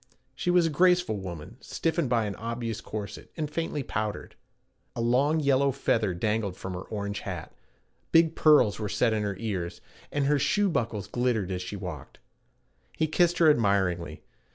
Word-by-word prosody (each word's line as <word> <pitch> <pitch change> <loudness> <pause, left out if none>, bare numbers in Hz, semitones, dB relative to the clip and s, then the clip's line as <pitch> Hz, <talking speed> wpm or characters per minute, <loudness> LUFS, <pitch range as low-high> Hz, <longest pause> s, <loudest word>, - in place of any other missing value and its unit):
She 130 - -3
was 175 -1 +5
a 165 - 0
graceful 180 - +3
woman, 95 +2 -8
stiffened 165 -4 -1
by 115 -3 +2
an 100 - -3
obvious 115 -1 -4
corset, 105 -2 -7
and 155 -2 -1
faintly 150 -3 -2
powdered. 110 -3 -4 0.6
A - - -5
long 130 +7 +2
yellow 140 -1 +3
feather 110 -7 0
dangled 105 0 -1
from 95 - -6
her 90 - -5
orange 100 0 -4
hat, - - -6 0.6
big 165 -1 +5
pearls 145 -10 +5
were 105 -2 -3
set 115 +4 +2
in 110 - 0
her 100 -2 -2
ears, 95 -5 -3 0.3
and 145 -1 0
her 145 +1 +3
shoe 205 +7 +2
buckles 115 - -1
glittered 115 -3 -1
as 90 -1 -2
she 90 +3 -5
walked. 90 -9 -7 0.8
He 160 - +2
kissed 175 +2 +2
her 165 - +5
admiringly. 95 - 0
115 Hz, 170 wpm, -27 LUFS, 100-150 Hz, 0.8 s, was